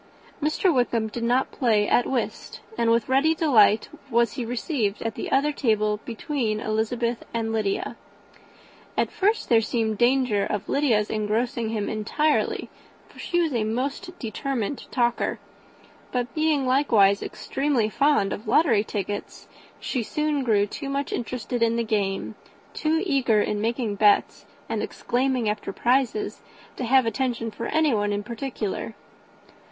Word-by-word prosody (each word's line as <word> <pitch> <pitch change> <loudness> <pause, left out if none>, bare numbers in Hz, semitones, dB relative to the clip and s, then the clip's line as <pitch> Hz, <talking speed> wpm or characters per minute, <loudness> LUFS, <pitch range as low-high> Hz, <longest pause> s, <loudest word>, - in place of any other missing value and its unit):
Mr. 310 +4 +2
Wickham 235 -4 +1
did 235 - -6
not 245 +3 +1
play 215 -5 +2
at 245 - +3
whist, 255 -3 -3 0.2
and 230 - +1
with 230 -1 +2
ready 275 +5 +3
delight 225 -10 +4 0.2
was 235 -2 +2
he 255 - -4
received 235 - -2
at 225 -1 -2
the - - -5
other 280 +2 +3
table 215 -6 +1
between 230 -2 -2
Elizabeth 230 +2 -1
and 225 -1 -1
Lydia. 210 -3 -1 1.0
At - - +1
first 420 +3 +1
there 230 -1 +5
seemed 220 -2 -1
danger 245 -4 +3
of 205 0 -3
Lydia's 235 -8 +1
engrossing 220 +2 -1
him 215 -2 -2
entirely, 290 +8 0 0.4
for - - -17
she 350 -1 0
was 320 -4 0
a 230 -3 +1
most 275 - -3
determined 255 +1 -3
talker; 240 -2 0 0.7
but 245 -1 -2
being 310 -3 +1
likewise 225 -7 +4
extremely 270 -5 -1
fond 275 -3 +2
of 215 - -7
lottery 235 -3 +4
tickets, 205 -1 -5 0.3
she 255 - -2
soon 300 +4 -1
grew 210 -4 +3
too 275 +7 -6
much 275 0 -2
interested 245 0 -3
in 230 0 +3
the 235 - 0
game, 200 -3 -1 0.4
too 320 +2 0
eager 265 - +2
in 210 0 0
making 225 -2 -1
bets 205 0 +3 0.2
and - - -2
exclaiming 255 -2 -1
after 210 -1 -2
prizes, 260 - 0 0.3
to 250 - -3
have 260 +1 +4
attention 235 -1 -1
for 230 +2 -5
anyone 245 -10 +1
in 205 0 -2
particular. 225 -2 -4
235 Hz, 145 wpm, -25 LUFS, 215-270 Hz, 1.0 s, there